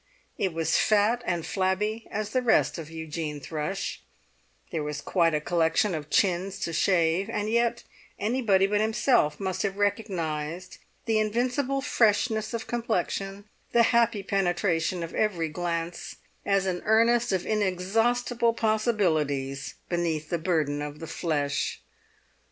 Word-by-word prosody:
It 190 - -1
was 165 0 +1
fat 215 +3 +3
and 175 -3 -1
flabby 210 +4 -1
as 210 0 -3
the 255 - +1
rest 230 -7 +2
of 160 -2 -7
Eugene 160 -2 -5
Thrush; 155 +6 -4 0.7
there 160 - -2
was 150 0 -4
quite 165 +1 +2
a - - +2
collection 170 +4 +1
of 155 -2 -5
chins 190 +2 +1
to 165 - -2
shave; 175 +2 +2
and 210 -1 -2
yet 235 0 +1 0.3
anybody 210 -4 +2
but 205 +1 +1
himself 220 - +2
must 190 -2 -2
have 200 -1 -2
recognised 180 -5 -2 0.3
the 225 -2 +2
invincible 250 +5 0
freshness 220 -4 +2
of 230 -2 -4
complexion, 200 -3 -2 0.3
the 235 - +6
happy 230 -3 +3
penetration 175 -2 0
of 165 - -7
every 175 -7 0
glance, 170 +1 -4 0.3
as 195 -1 +2
an 180 -2 -1
earnest 230 +2 +3
of 185 -2 0
inexhaustible 225 +4 +1
possibilities 160 - 0
beneath 165 -3 -1
the 170 - 0
burden 155 -4 0
of 150 0 -5
the 165 - -7
flesh. 145 -3 -1
190 Hz, 135 wpm, -27 LUFS, 165-220 Hz, 0.7 s, the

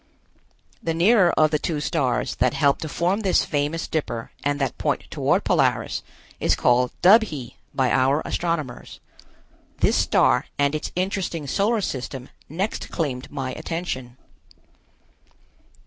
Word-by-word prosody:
The 165 -1 -2
nearer 185 +1 +5
of 155 -1 +4
the 150 - +1
two 155 -1 -2
stars 140 -3 0
that 125 +1 +2
help 140 0 +3
to 155 - -5
form 180 +7 0
this 195 -4 +2
famous 150 +2 -1
Dipper 120 -7 -3
and 145 0 0
that 135 - -1
point - - 0
toward - - +1
Polaris, - - +1 0.4
is - - +2
called 125 0 +3
Dubhe 180 - +4 0.2
by 130 -2 +1
our 135 +4 +2
astronomers. 160 -8 -3 0.8
This - - +2
star - - +3
and 140 0 +2
its 155 - -3
interesting 180 -4 -2
solar 210 - +1
system 130 -5 -5 0.2
next 185 +8 -3
claimed 135 -6 -3
my 135 -3 -3
attention. 130 -8 -5
150 Hz, 130 wpm, -23 LUFS, 135-175 Hz, 0.8 s, nearer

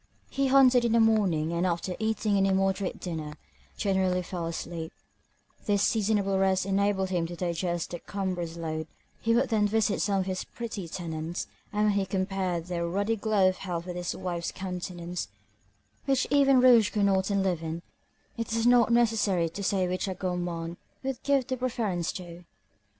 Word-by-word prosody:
He 275 0 +1
hunted 260 -2 +6
in 235 -1 +2
the 230 - +5
morning, 195 -8 +2
and 170 +1 0
after 180 0 -1
eating 220 -1 0
an 195 0 +3
immoderate 195 0 0
dinner, 155 -4 -5 0.4
generally 190 -2 +1
fell 175 -2 -4
asleep: 165 0 -5 0.8
this 205 -1 +2
seasonable 205 -3 +1
rest 190 -1 +2
enabled 195 -1 +1
him 170 -2 0
to 175 - -7
digest 175 -1 -2
the 175 - -5
cumbrous 180 -4 -4
load; 160 -1 -3 0.3
he 230 0 +2
would 255 +3 +2
then 215 -3 +3
visit 215 -1 +1
some 200 -2 +1
of - - -3
his 185 -1 -2
pretty 220 -6 -6
tenants; 165 0 -4 0.3
and 210 0 0
when 210 - +4
he 200 -1 0
compared 190 -3 -1
their 170 -1 -2
ruddy 200 +6 0
glow 210 -3 +2
of 185 - -4
health 175 -3 -4
with 180 -1 -5
his 175 0 -3
wife's 175 -2 -3
countenance, 180 - -5 0.8
which 270 -1 +2
even 275 -2 +5
rouge 240 -4 +6
could 205 -2 +1
not 190 -1 +2
enliven, 175 -4 -1 0.5
it 230 -1 -3
is 230 0 +1
not 240 -1 +5
necessary 215 -7 +2
to 200 - -7
say 190 -1 +1
which 185 +2 -2
a 190 - -3
gourmand 175 -2 -3 0.3
would 265 -2 -3
give 275 -3 +2
the 260 - -2
preference 220 -9 -1
to. 175 -1 -9
190 Hz, 170 wpm, -28 LUFS, 175-215 Hz, 0.8 s, hunted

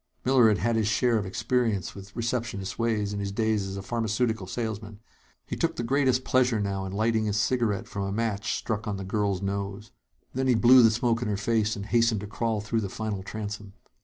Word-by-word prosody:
Miller 130 -3 +5
had 105 -2 +3
had 115 +1 0
his 110 -2 +1
share 115 +1 +2
of 100 - -4
experience 110 0 0
with 100 0 -12
receptionists' 115 -4 -3
ways, 110 -3 0
in 100 - -3
his 100 -1 -3
days 110 -1 0
as 95 0 -5
a 100 - -6
pharmaceutical 110 -2 -1
salesman. 110 -1 -4 0.5
He - - -4
took - - 0
the 120 - -3
greatest 130 0 +2
pleasure 125 -4 +2
now 100 -1 -2
in 95 - -5
lighting 110 +2 +1
his 105 -1 0
cigarette 110 -1 0
from 100 -2 -4
a 100 - -3
match 110 -1 -1
struck 110 0 -3
on 105 -2 -2
the 95 - -5
girl's 100 -1 -1
nose. 100 +2 -4 0.4
Then 130 +1 0
he 125 - +4
blew 125 +3 +7
the 115 - +7
smoke 115 +1 +1
in 120 - -1
her 105 -1 -1
face 110 +1 +1
and 100 - -6
hastened 115 -2 +2
to - - -5
crawl 110 0 -1
through 110 +2 -1
the 100 - -3
final 105 -1 -4
transom. 105 0 -6
110 Hz, 220 wpm, -27 LUFS, 100-115 Hz, 0.5 s, blew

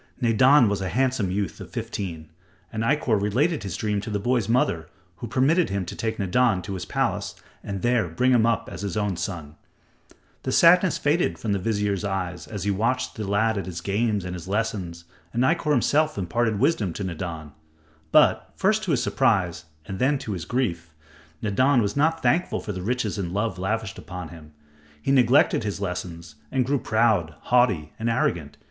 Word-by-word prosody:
Nadan 125 +2 +5
was 100 -1 -1
a 95 - -2
handsome 125 -1 0
youth 100 +1 -3
of - - -9
fifteen, 80 -5 -5 0.4
and 110 - -2
Ikkor 115 -4 +1
related 140 - +1
his 95 -4 -5
dream 105 -2 -1
to 105 - -6
the 105 - -1
boy's 115 0 0
mother 85 -9 +1 0.3
who 120 - -6
permitted 140 - +2
him 100 -1 -2
to - - -7
take 110 0 -3
Nadan 100 0 +2
to 100 - -5
his 95 - -5
palace - - -2 0.3
and 100 -2 -5
there 120 -5 +2
bring 125 +11 +1
him 120 -3 +4
up 115 -2 +1
as 85 - -7
his 100 +1 -3
own 105 -3 0
son. 80 -4 -5 0.8
The - - -3
sadness 180 0 +5
faded 155 +4 +1
from 110 - -3
the 100 - +1
vizier's 105 -1 -1
eyes 95 -3 -3
as 105 -3 -5
he 100 - +1
watched 115 +6 0
the 110 -3 -5
lad 105 +1 +1
at 95 - -6
his 85 -2 -5
games 105 -1 -1
and 90 - -4
his 90 0 -7
lessons, 95 -5 -3 0.3
and 120 - +1
Ikkor 160 +2 +1
himself 150 +2 +2
imparted 110 +4 0
wisdom 105 - +1
to 100 - -5
Nadan. 85 -4 -5 0.6
But, - - +4
first 215 +3 +2
to 180 - -1
his 125 - +1
surprise, 90 -10 +1 0.2
and 95 - -6
then 140 +3 +2
to 110 - -4
his 90 -5 -4
grief, 85 - -2 0.5
Nadan 125 +6 +3
was 105 -3 0
not 160 +3 +1
thankful 160 +9 +1
for 105 - -5
the 95 -2 -5
riches 110 -1 -2
and 90 -1 -3
love 105 -1 -1
lavished 110 +2 -2
upon 90 -2 -7
him. 80 -2 -13 0.5
He 135 - -1
neglected 130 -2 +4
his 105 -2 -3
lessons 90 -4 -5
and 130 -2 +1
grew 140 +2 +1
proud, 110 -10 +1
haughty 110 -12 +2
and 115 +1 -1
arrogant. 85 -9 -1
105 Hz, 190 wpm, -24 LUFS, 90-125 Hz, 0.8 s, Nadan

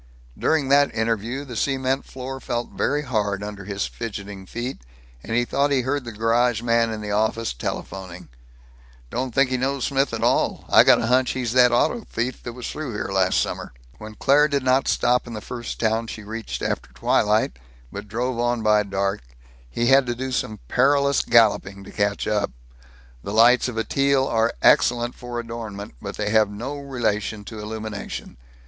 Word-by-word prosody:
During 155 -4 +1
that 140 +1 +4
interview 115 +4 -1
the 125 -4 -8
cement 135 +2 0
floor 135 +1 -7
felt 120 -2 -3
very 145 +2 0
hard 105 -6 -1
under 105 -2 -7
his 100 0 -2
fidgeting 100 -4 -7
feet, 120 +5 -5 0.4
and 115 - -4
he 120 0 +2
thought 140 +3 +1
he 135 -2 +2
heard 130 +1 -2
the 120 - -5
garage 115 +1 +1
man 115 -1 +2
in 110 -1 -5
the 105 -1 -4
office 110 +2 0
telephoning, 90 +8 -6 0.8
"Don't 130 0 -2
think 130 +2 +2
he 130 - +1
knows 135 +1 -1
Smith 140 0 +1
at 115 0 -3
all. 120 - +1
I - - +8
got - - +5
a - - 0
hunch 125 +2 +2
he's 125 -3 -2
that 125 -1 +6
auto 175 - +2
thief 125 - -4
that 120 - -7
was 125 0 -6
through 150 -6 -5
here 105 - -3
last 95 -1 +2
summer." - - -3 0.3
When 110 0 -9
Claire 145 +6 +4
did 140 -2 -1
not 130 +1 +2
stop 125 0 +2
in 120 - -7
the 110 - -4
first 120 +2 -6
town 115 0 0
she 110 - -7
reached 110 +2 -5
after - - -3
twilight, 105 - +1 0.3
but - - -7
drove 120 +3 -2
on 120 -1 0
by 105 -1 +4
dark, 100 0 -2 0.5
he 120 - -1
had 135 +1 +5
to 120 - -1
do 130 +2 -4
some 110 -4 -2
perilous 140 +1 +3
galloping 105 -4 +3
to - - -11
catch 100 0 -1
up. 105 -1 0 0.7
The 100 - -6
lights 120 +4 +5
of 120 -3 -5
a 110 - +1
Teal 140 0 +2
are 115 -2 +1
excellent 120 0 +4
for 120 -1 -6
adornment, 115 -3 -7
but - - -6
they 105 0 -1
have 110 -2 +4
no 120 +8 -5
relation 110 -6 -2
to 110 0 -8
illumination. 105 - -6
115 Hz, 190 wpm, -23 LUFS, 105-130 Hz, 0.8 s, I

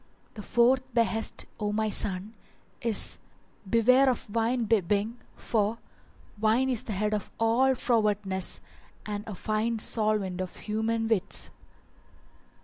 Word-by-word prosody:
The 215 - -8
FOURTH 250 +3 +2
BEHEST, 225 -1 0
O 210 -1 -1
my 215 0 0
son, 195 +2 -2 0.5
is 230 -3 +3 0.5
Beware 255 +5 +5
of 230 -4 -3
wine 230 +2 +1
bibbing, 210 +2 +1 0.2
for 220 0 -1 0.6
wine 230 +5 +2
is 240 - +1
the 215 - -5
head 210 +2 -1
of 210 -2 -3
all 245 +4 +3
frowardness 210 -6 0 0.4
and 210 -1 -4
a 210 - -5
fine 220 +4 -1
solvent 210 -4 +1
of 185 - -6
human 225 +1 -2
wits. 205 -3 -2
220 Hz, 125 wpm, -28 LUFS, 210-230 Hz, 0.6 s, Beware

